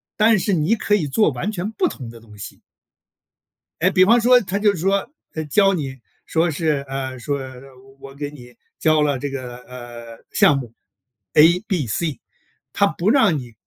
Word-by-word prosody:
但 215 -1 +4
是 200 - 0
你 170 +6 +2
可 210 -1 +1
以 175 -7 0
做 210 +9 +2
完 150 - -3
全 200 +1 -4
不 365 - 0
同 125 - -7
的 115 0 -12
东 110 -2 -17
西。 100 - -10 1.2
诶， 185 +3 +3
比 185 -1 +5
方 235 +4 +5
说， 250 +2 +6
他 195 -1 -3
就 205 0 +2
说， 195 +5 0 0.3
呃， 160 0 -3
教 195 +6 +3
你 140 -6 -3 0.3
说 165 +1 +1
是， 150 -2 -1
呃， 130 -1 -4
说： 140 +3 -2 0.6
“我 135 - -10
给 145 0 -5
你 125 -4 -14 0.2
教 155 -1 +3
了 145 -3 0
这 145 - -3
个， 130 -3 -6
呃， 120 -2 -11
项 145 - +4
目 120 -4 -7 0.6
A、 165 +4 +6
B、 175 -8 -1
C。” 140 +5 -3 0.5
他 200 - +3
不 195 +3 0
让 220 - +4
你 120 -3 -9
155 Hz, 195 characters per minute, -21 LUFS, 130-195 Hz, 1.2 s, 说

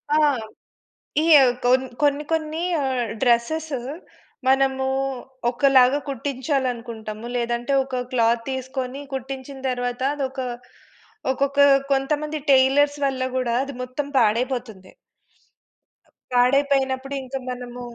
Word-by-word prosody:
ఆ! - - +4 1.1
ఈ - - +1 0.4
కోన్ 255 +1 +4 0.2
కొన్ని, 290 0 +2
కొన్ని 320 0 -1 0.2
ఆహ్, 255 -4 -1
డ్రెసెస్ 260 +7 +1 0.8
మనము 265 0 +3 0.6
ఒకలాగా 265 +1 +4
కుట్టించాలనుకుంటాము. 245 -5 -3
లేదంటే, 240 +2 -1
ఒక 260 -1 -3
క్లాత్ 230 -1 +3
తీసుకొని 260 +1 -4
కుట్టించిన 265 +1 -6
తర్వాత 245 0 -3
అది 280 -2 -1
ఒక 265 +1 -9 0.9
ఒకొక్క 280 +1 +1 0.3
కొంతమంది 295 +3 0
టైలర్స్ 280 +2 +4
వల్ల 265 -1 -1
కూడా 255 -2 0
అది 280 0 -7
మొత్తం 255 +3 -4
పాడైపోతుంది. 230 -3 0 1.4
పాడైపోయినప్పుడు. 270 +1 +2
ఇంక 260 +1 -8
మనము 245 0 -6
260 Hz, 95 wpm, -23 LUFS, 245-275 Hz, 1.4 s, ఆ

